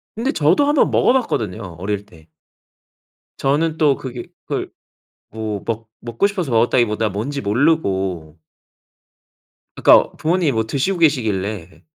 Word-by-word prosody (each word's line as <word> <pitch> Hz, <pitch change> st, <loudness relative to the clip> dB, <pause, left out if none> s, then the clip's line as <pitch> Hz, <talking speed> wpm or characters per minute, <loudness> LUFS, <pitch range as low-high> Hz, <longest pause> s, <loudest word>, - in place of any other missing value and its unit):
근데 245 Hz, +5 st, -1 dB
저도 160 Hz, -, +3 dB
한번 290 Hz, -1 st, +3 dB
먹어봤거든요 110 Hz, -, 0 dB
어릴 100 Hz, +1 st, -3 dB
때. 85 Hz, -6 st, -19 dB, 1.1 s
저는 155 Hz, +4 st, 0 dB
또 145 Hz, -3 st, +3 dB
그게 125 Hz, -2 st, -7 dB, 0.2 s
그걸 -, -, -3 dB, 0.6 s
뭐 110 Hz, -2 st, -5 dB
먹 115 Hz, -1 st, -4 dB
먹고 120 Hz, -, -1 dB
싶어서 185 Hz, -, -4 dB
먹었다기보다 115 Hz, -2 st, +2 dB
뭔지 130 Hz, +9 st, -4 dB
모르고. 95 Hz, -, 0 dB, 1.4 s
그니까 -, -, +5 dB
부모님이 165 Hz, -2 st, +1 dB
뭐 110 Hz, -2 st, 0 dB
드시고 145 Hz, +10 st, -1 dB
계시길래 105 Hz, -, -1 dB
115 Hz, 275 characters per minute, -19 LUFS, 100-155 Hz, 1.4 s, 그니까